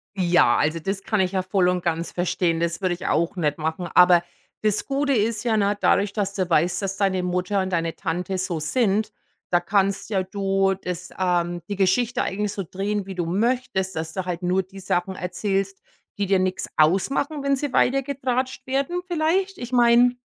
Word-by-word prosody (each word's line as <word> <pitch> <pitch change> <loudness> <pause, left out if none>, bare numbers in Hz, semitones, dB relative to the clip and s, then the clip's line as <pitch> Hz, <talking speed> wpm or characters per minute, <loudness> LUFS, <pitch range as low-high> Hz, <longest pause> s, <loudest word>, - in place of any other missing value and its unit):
Ja, 175 -10 +4
also 155 +2 +1
das 195 +4 -3
kann 215 -3 +1
ich 185 0 0
ja 190 -1 0
voll 185 -1 +1
und 180 -1 0
ganz 170 0 -1
verstehen. 175 -1 0
Das 170 +2 -1
würde 185 -2 +1
ich 175 - -6
auch 170 +4 +1
nicht 150 -5 0
machen. 160 +2 -3
Aber 180 -1 +7 0.4
das 215 -1 +1
Gute 280 +1 0
ist 220 -1 +1
ja 225 -2 +1
na, 205 0 +2
dadurch, 200 0 +2
dass 200 -1 -2
du 185 -3 -1
weißt, 175 +3 +2
dass 195 0 -3
deine 190 -2 +1
Mutter 180 +2 0
und 190 - -3
deine 165 -2 -1
Tante 180 +2 -3
so 180 -3 -2
sind, 210 +5 +1 0.4
da 175 - +3
kannst 195 +3 0
ja 190 - +2
du 195 0 0
das, 180 -1 -6
ähm, 175 -2 0
die 205 - -3
Geschichte 200 +6 +1
eigentlich 205 +1 -2
so 195 - -4
drehen, 195 +3 -3
wie 190 - -6
du 175 -2 -2
möchtest, 200 0 -1
dass 160 0 -4
du 190 -2 -3
halt 180 0 -4
nur 185 +2 +2
die 195 +1 -13
Sachen 185 0 -1
erzählst, 195 +2 -2 0.4
die 200 - 0
dir 195 0 +3
nichts 185 0 -1
ausmachen, 270 - +2
wenn 280 0 +2
sie 270 -1 -3
weiter 275 +2 +3
getratscht 260 -1 -2
werden 275 +7 -1
vielleicht. 360 +3 0
Ich 245 0 -7
meine, 245 0 +5
190 Hz, 200 wpm, -23 LUFS, 180-220 Hz, 0.4 s, Aber